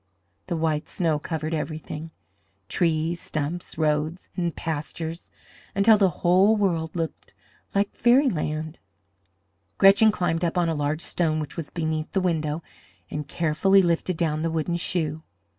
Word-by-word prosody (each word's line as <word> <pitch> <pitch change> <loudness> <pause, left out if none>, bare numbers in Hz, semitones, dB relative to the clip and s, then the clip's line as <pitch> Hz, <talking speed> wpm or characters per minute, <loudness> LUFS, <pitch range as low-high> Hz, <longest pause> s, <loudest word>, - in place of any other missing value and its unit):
The 175 -2 -1
white 160 -2 0
snow 160 -4 0
covered 160 +1 -3
everything 155 0 -4 0.6
trees, 165 - 0
stumps, 155 +4 -4
roads, 155 +2 0
and 170 -2 -1
pastures 160 +1 -4 0.5
until 210 +2 +5
the 195 -2 +5 0.2
whole 190 +5 +5
world 170 -5 0
looked 165 -2 -5 0.4
like 200 +1 +1
fairyland. 170 - +2 1.0
Gretchen 200 +3 +7
climbed 175 -4 -1
up 170 +1 0
on 175 -1 +2
a - - +1
large 150 +1 -1
stone 160 -3 0
which 150 - -5
was 165 -4 -5
beneath 155 -2 -2
the 195 - +2
window 160 -3 -1 0.5
and 150 -1 -4
carefully 175 +6 +3
lifted 170 0 0
down 155 -2 0
the 165 - 0
wooden 165 +1 -1
shoe. 160 -3 -1
165 Hz, 140 wpm, -25 LUFS, 155-180 Hz, 1.0 s, Gretchen